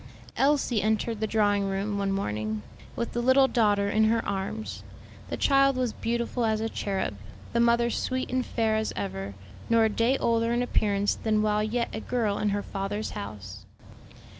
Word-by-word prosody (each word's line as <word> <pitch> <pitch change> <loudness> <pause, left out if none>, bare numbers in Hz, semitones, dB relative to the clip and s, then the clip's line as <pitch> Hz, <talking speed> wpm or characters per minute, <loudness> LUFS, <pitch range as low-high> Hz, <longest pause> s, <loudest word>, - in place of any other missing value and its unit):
Elsie 270 -5 +2
entered 220 +1 0
the 220 - 0
drawing 205 -2 +2
room 200 +1 -2
one 195 -1 0
morning, 110 - -2 0.3
with 235 - -3
the 240 - -2
little 260 +2 +5
daughter 205 -5 +2
in 215 +2 +3
her 225 +1 +2
arms. 200 +2 -4 0.5
The - - -3
child 275 -1 +4
was 250 -3 -1
beautiful 235 +1 -2
as 220 -1 +1
a 225 - -1
cherub, 195 - -2 0.4
the 235 - +2
mother 235 0 +3
sweet 255 +2 -2
and 255 0 +1
fair 225 -3 0
as 220 - -1
ever, 100 0 -4 0.3
nor 230 -1 +5
a - - +3
day 230 +5 +2
older 230 -1 +1
in 240 +1 +1
appearance 205 -4 +1
than 215 -1 0
while 210 0 +2
yet 235 +2 -1
a 220 - -3
girl 220 -5 -1
in 210 - +1
her 205 0 -1
father's 205 +2 -3
house. 100 -1 -7
220 Hz, 180 wpm, -27 LUFS, 200-235 Hz, 0.5 s, little